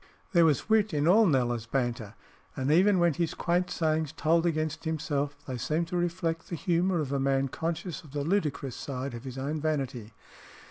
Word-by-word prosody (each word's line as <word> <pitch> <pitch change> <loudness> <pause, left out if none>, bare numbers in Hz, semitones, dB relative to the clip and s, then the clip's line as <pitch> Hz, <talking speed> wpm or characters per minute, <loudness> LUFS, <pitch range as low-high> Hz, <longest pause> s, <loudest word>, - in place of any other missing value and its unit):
There 170 -4 +5
was 150 -4 +2
wit 215 -5 +2
in 145 +1 +1
all 210 +4 +6
Kneller's 120 -6 +1
banter, 120 -4 -2 0.4
and 135 +1 0
even 190 +5 +5
when 175 -2 +3
his 165 +2 -2
quaint 180 +1 0
sayings 155 -3 0
told 165 +1 +2
against 155 -1 -1
himself, 145 -3 -2
they 130 -2 -5
seemed 160 +7 -1
to 180 - -3
reflect 170 -1 -1
the 170 - -3
humour 175 +1 +1
of 140 -2 -3
a 140 - +1
man 135 0 +1
conscious 165 +2 -4
of 155 - -14
the 145 +1 -3
ludicrous 150 - -1
side 135 -1 -5
of 120 +2 -8
his 130 -1 -7
own 145 +3 -3
vanity. 135 -8 -2
155 Hz, 190 wpm, -29 LUFS, 135-170 Hz, 0.4 s, all